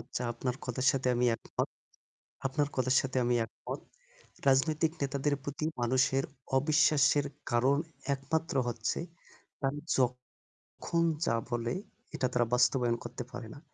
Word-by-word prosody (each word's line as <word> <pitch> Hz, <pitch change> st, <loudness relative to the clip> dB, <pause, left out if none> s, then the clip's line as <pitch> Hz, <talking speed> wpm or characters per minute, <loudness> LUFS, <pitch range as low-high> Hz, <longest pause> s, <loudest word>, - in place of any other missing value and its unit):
আচ্ছা, -, -, -5 dB
আপনার 125 Hz, +1 st, -2 dB
কথার 130 Hz, +1 st, -2 dB
সাথে 130 Hz, -2 st, 0 dB
আমি 125 Hz, +1 st, +2 dB
একমত। -, -, -3 dB, 0.8 s
আপনার 145 Hz, +2 st, 0 dB
কথার 130 Hz, 0 st, +2 dB
সাথে 135 Hz, 0 st, -4 dB
আমি 120 Hz, 0 st, +2 dB
একমত। 110 Hz, -, -7 dB, 0.7 s
রাজনৈতিক 155 Hz, +4 st, +3 dB
নেতাদের 140 Hz, +1 st, 0 dB
প্রতি 145 Hz, +2 st, -3 dB, 0.2 s
মানুষের 130 Hz, +2 st, +3 dB, 0.3 s
অবিশ্বাসের 145 Hz, -1 st, +4 dB, 0.3 s
কারণ 130 Hz, +4 st, +4 dB, 0.4 s
একমাত্র 145 Hz, +3 st, -2 dB
হচ্ছে 120 Hz, -1 st, -1 dB, 0.6 s
তারা 135 Hz, +1 st, 0 dB, 0.8 s
যখন 170 Hz, 0 st, -2 dB, 0.2 s
যা 115 Hz, -, +2 dB
বলে 120 Hz, 0 st, -1 dB, 0.4 s
এটা 130 Hz, -, +1 dB
তারা 120 Hz, -1 st, +3 dB
বাস্তবায়ন 125 Hz, -1 st, +3 dB
করতে -, -, -5 dB
পারে 125 Hz, -2 st, -6 dB
না। -, -, -11 dB
130 Hz, 125 wpm, -31 LUFS, 125-145 Hz, 0.8 s, অবিশ্বাসের